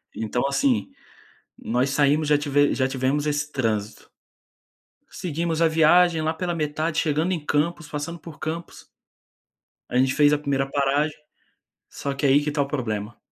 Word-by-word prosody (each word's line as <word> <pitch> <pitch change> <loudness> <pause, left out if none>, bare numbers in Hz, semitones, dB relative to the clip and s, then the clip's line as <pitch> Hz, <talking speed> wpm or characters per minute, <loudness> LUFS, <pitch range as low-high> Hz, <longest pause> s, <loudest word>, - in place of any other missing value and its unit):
Então, 115 +2 -2
assim, 255 - +1 0.7
nós 140 - 0
saímos 145 +2 +2
já 150 0 +4
tive 145 0 +2
já 130 - +1
tivemos 135 +2 -1
esse 150 0 -1
trânsito. 110 -6 -2 1.0
Seguimos 165 -1 -3
a 165 - +5
viagem, 165 +1 +4
lá 155 0 0
pela 175 +1 -3
metade, 155 +1 -2
chegando 160 +4 +1
em 165 -5 -3
Campos, 150 +2 -1
passando 150 +3 -5
por 160 -3 -12
Campos 165 +3 -6 1.0
a - - -5
gente 130 +1 +3
fez 145 0 +5
a - - +3
primeira 140 -2 -1
paragem, 145 +2 0 0.7
só 140 -1 -4
que 140 +1 0
aí 140 +2 +4
que 150 - -3
está 145 -1 0
o - - -2
problema 110 -6 -3
150 Hz, 160 wpm, -24 LUFS, 135-160 Hz, 1.0 s, a